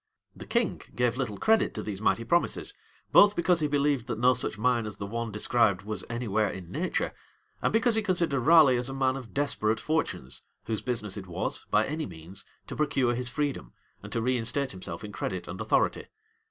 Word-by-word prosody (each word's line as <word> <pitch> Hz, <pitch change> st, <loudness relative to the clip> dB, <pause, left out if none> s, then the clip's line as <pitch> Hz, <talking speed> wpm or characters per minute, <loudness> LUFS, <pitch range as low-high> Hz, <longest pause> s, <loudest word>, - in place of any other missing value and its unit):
The -, -, -10 dB
king -, -, 0 dB
gave 120 Hz, -1 st, +1 dB
little 125 Hz, -6 st, -3 dB
credit 220 Hz, -, +2 dB
to -, -, -3 dB
these 100 Hz, -2 st, -5 dB
mighty 115 Hz, -, +2 dB
promises; 170 Hz, +9 st, +1 dB, 0.4 s
both 205 Hz, 0 st, +7 dB
because 175 Hz, 0 st, +2 dB
he 150 Hz, -, +1 dB
believed 145 Hz, -3 st, +1 dB
that 115 Hz, -3 st, -3 dB
no 125 Hz, +2 st, +5 dB
such 125 Hz, -3 st, -3 dB
mine 120 Hz, 0 st, +1 dB
as 105 Hz, -1 st, -6 dB
the 100 Hz, -, -5 dB
one 115 Hz, +2 st, -4 dB
described 105 Hz, -2 st, +2 dB
was 105 Hz, +1 st, -4 dB
any 120 Hz, 0 st, -3 dB
where 105 Hz, 0 st, +1 dB
in 90 Hz, -3 st, -8 dB
nature, -, -, -1 dB, 0.5 s
and -, -, +1 dB
because 230 Hz, +2 st, +3 dB
he 220 Hz, -, +2 dB
considered 175 Hz, -8 st, +1 dB
Raleigh 145 Hz, -1 st, +6 dB
as 125 Hz, +2 st, -1 dB
a 135 Hz, -, -5 dB
man 130 Hz, -1 st, +1 dB
of 130 Hz, -4 st, -8 dB
desperate 115 Hz, -6 st, 0 dB
fortunes, 110 Hz, -, -2 dB, 0.2 s
whose 110 Hz, -1 st, -3 dB
business 110 Hz, -5 st, -3 dB
it 95 Hz, -2 st, -7 dB
was, 85 Hz, -, -4 dB
by 105 Hz, +1 st, +3 dB
any 155 Hz, +2 st, -3 dB
means, 85 Hz, +3 st, -9 dB, 0.2 s
to -, -, -7 dB
procure 135 Hz, -5 st, +1 dB
his 120 Hz, 0 st, -2 dB
freedom, 140 Hz, -, -3 dB, 0.3 s
and -, -, -10 dB
to 115 Hz, -, -1 dB
reinstate 130 Hz, +2 st, 0 dB
himself 95 Hz, +2 st, -7 dB
in 105 Hz, -, -7 dB
credit -, -, -4 dB
and -, -, -6 dB
authority. -, -, +1 dB
120 Hz, 205 wpm, -28 LUFS, 105-145 Hz, 0.5 s, both